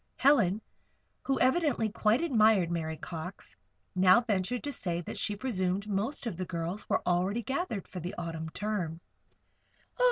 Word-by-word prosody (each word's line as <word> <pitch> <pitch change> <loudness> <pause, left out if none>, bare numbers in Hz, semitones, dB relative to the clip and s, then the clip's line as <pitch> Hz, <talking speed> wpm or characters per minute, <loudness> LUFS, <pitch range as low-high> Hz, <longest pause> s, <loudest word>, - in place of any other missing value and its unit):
Helen, 220 -7 +4 0.6
who 270 -1 +1
evidently 260 -3 +3
quite 215 +4 +2
admired 220 - +4
Mary 160 -2 -2
Cox, 180 +3 -7 0.4
now 185 +4 +6
ventured 225 +1 -1
to 290 - -2
say 175 -9 -2
that - - -7
she 210 - 0
presumed 200 -4 -1
most 210 +8 -2
of 215 -8 -3
the 185 - -3
girls 170 +3 -4
were - - +1
already 185 +6 +1
gathered 265 - -2
for 185 - -7
the 175 +2 -5
Autumn 165 -2 -4
term. 180 -4 -3
200 Hz, 150 wpm, -30 LUFS, 175-235 Hz, 0.6 s, now